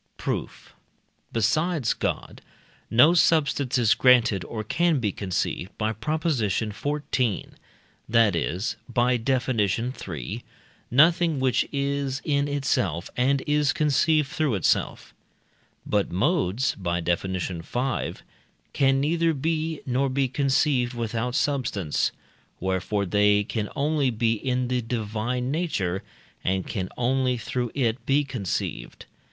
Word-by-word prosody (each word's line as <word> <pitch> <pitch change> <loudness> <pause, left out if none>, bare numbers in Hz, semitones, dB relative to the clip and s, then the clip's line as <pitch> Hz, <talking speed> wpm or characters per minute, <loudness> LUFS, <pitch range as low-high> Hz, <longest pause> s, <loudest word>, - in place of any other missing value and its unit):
Proof. - - -5 0.6
Besides 145 - +1
God, - - -3 0.5
no 130 +9 +6
substance 145 -6 +2
is 115 -4 +4
granted 120 -7 +4
or 110 -2 -5
can 170 +3 +1
be 105 -5 0
conceived 95 -1 -3
(by 110 0 0
Prop. 150 +9 -3
xiv.), 125 - -1 0.6
that 115 -4 +4
is 90 +5 -2
(by 125 +1 +2
Def. 130 +2 0
iii.) 105 - -2 0.5
nothing 165 +3 +4
which 130 -1 +1
is 140 -1 -1
in 140 -1 +1
itself 100 - -1
and 135 +2 +2
is 150 +1 +2
conceived 150 0 +2
through 155 -8 0
itself. 95 - 0 0.7
But 105 -2 0
modes 130 - +1
(by 85 -2 -2
Def. 85 +2 0
v.) 95 +7 -3 0.6
can 135 0 +3
neither 165 +3 +2
be, 160 +2 -2
nor 135 +2 +1
be 135 +1 +1
conceived 130 -2 +1
without 115 +1 -2
substance; 125 - 0 0.5
wherefore 95 +2 -1
they 105 +2 +3
can 105 0 -3
only 145 -1 +1
be 115 -1 +1
in 125 +2 -1
the 125 0 0
divine 115 +2 -2
nature, 100 - -1 0.4
and 95 0 0
can 95 -5 -3
only 125 +1 +1
through 120 +1 -3
it 125 -3 0
be 140 +2 +3
conceived. 100 - -4
125 Hz, 120 wpm, -25 LUFS, 105-140 Hz, 0.7 s, no